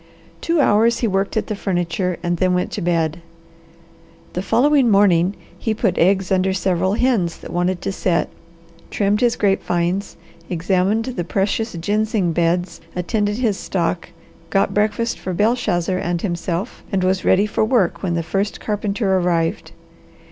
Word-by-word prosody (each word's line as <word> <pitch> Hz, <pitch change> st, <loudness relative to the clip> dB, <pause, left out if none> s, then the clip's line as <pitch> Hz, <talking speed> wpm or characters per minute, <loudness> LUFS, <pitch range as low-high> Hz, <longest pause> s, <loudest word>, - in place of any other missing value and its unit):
Two 335 Hz, -1 st, +1 dB
hours 230 Hz, -3 st, +3 dB
he 235 Hz, -, +2 dB
worked 195 Hz, +1 st, -1 dB
at 220 Hz, -, 0 dB
the 215 Hz, -, -3 dB
furniture, 180 Hz, -2 st, -1 dB
and 175 Hz, 0 st, 0 dB
then 185 Hz, +1 st, +2 dB
went 180 Hz, -, -1 dB
to -, -, -4 dB
bed. 170 Hz, -1 st, 0 dB, 1.1 s
The 180 Hz, -, -2 dB
following 265 Hz, +4 st, +3 dB
morning 195 Hz, -2 st, +4 dB, 0.2 s
he 220 Hz, -2 st, -1 dB
put 210 Hz, -5 st, 0 dB
eggs 190 Hz, +1 st, +2 dB
under 190 Hz, 0 st, +2 dB
several 190 Hz, 0 st, 0 dB
hens 225 Hz, -9 st, +1 dB
that -, -, -10 dB
wanted 175 Hz, +1 st, -1 dB
to -, -, -1 dB
set, 180 Hz, -2 st, 0 dB, 0.6 s
trimmed 205 Hz, +1 st, +1 dB
his 240 Hz, -2 st, +3 dB
grape 195 Hz, -2 st, +1 dB
vines, 175 Hz, +3 st, -1 dB, 0.3 s
examined 190 Hz, +5 st, +1 dB
the 245 Hz, -9 st, -3 dB
precious 205 Hz, +5 st, -1 dB
ginseng 205 Hz, +1 st, 0 dB
beds, 175 Hz, +1 st, 0 dB
attended 205 Hz, +3 st, -1 dB
his 225 Hz, -6 st, 0 dB
stock, 175 Hz, -2 st, -2 dB, 0.4 s
got 195 Hz, +3 st, +1 dB
breakfast 215 Hz, +3 st, 0 dB
for 185 Hz, -, -4 dB
Belshazzar 190 Hz, -5 st, +1 dB
and 175 Hz, -1 st, -2 dB
himself, 180 Hz, +2 st, -3 dB
and 190 Hz, -2 st, 0 dB
was 185 Hz, 0 st, +1 dB
ready 200 Hz, +2 st, +4 dB
for 215 Hz, +1 st, 0 dB
work 215 Hz, -6 st, +1 dB
when 175 Hz, -3 st, -1 dB
the 170 Hz, -, -1 dB
first 195 Hz, +5 st, -2 dB
carpenter 205 Hz, -2 st, 0 dB
arrived. 170 Hz, -2 st, -1 dB
190 Hz, 155 wpm, -20 LUFS, 175-210 Hz, 1.1 s, morning